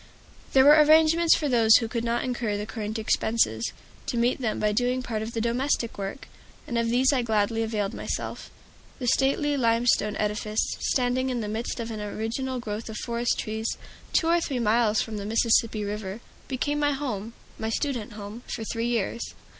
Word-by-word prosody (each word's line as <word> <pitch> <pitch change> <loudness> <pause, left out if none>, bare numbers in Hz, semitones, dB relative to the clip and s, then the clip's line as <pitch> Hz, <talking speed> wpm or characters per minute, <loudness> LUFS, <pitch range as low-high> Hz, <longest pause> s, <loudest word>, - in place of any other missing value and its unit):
There 265 0 +6
were 300 +1 +8
arrangements 320 +2 +5
for 300 - -1
those 230 -4 +5
who 230 - +3
could 230 0 -3
not 235 0 0
incur 235 -5 -2
the 205 - -4
current 215 0 -4
expenses, 220 - +1 0.4
to 240 - -2
meet 240 +3 +1
them 225 -3 -1
by 210 0 +2
doing 250 +3 0
part 225 -3 -3
of 220 +2 -5
the 225 - -1
domestic 235 0 0
work, 195 +6 -6 0.4
and 240 - -5
of 230 0 +1
these 255 +4 +3
I 260 - +2
gladly 225 -1 +1
availed 215 -2 -1
myself. - - -5 0.5
The 250 - -5
stately 280 +4 +2
limestone 230 -3 +2
edifice, 210 +1 -1
standing 255 0 0
in 245 -2 -1
the 210 - -3
midst 225 +4 -3
of 230 0 -4
an 215 -1 -5
original 225 +5 -3
growth 220 -1 -5
of 215 - -6
forest 235 0 -1
trees, 220 +1 -3 0.3
two - - +2
or 340 +1 +3
three 275 -5 -2
miles 220 -1 +2
from 220 -2 -6
the 200 - -4
Mississippi 225 -1 +2
River, 205 0 -4 0.3
became 290 +3 -1
my 290 -1 +2
home 230 -6 -4 0.3
my 220 - -2
student 235 -3 -2
home 210 +2 -8
for 225 - -4
three 230 +1 -2
years. 235 -1 -2
230 Hz, 185 wpm, -26 LUFS, 215-255 Hz, 0.5 s, were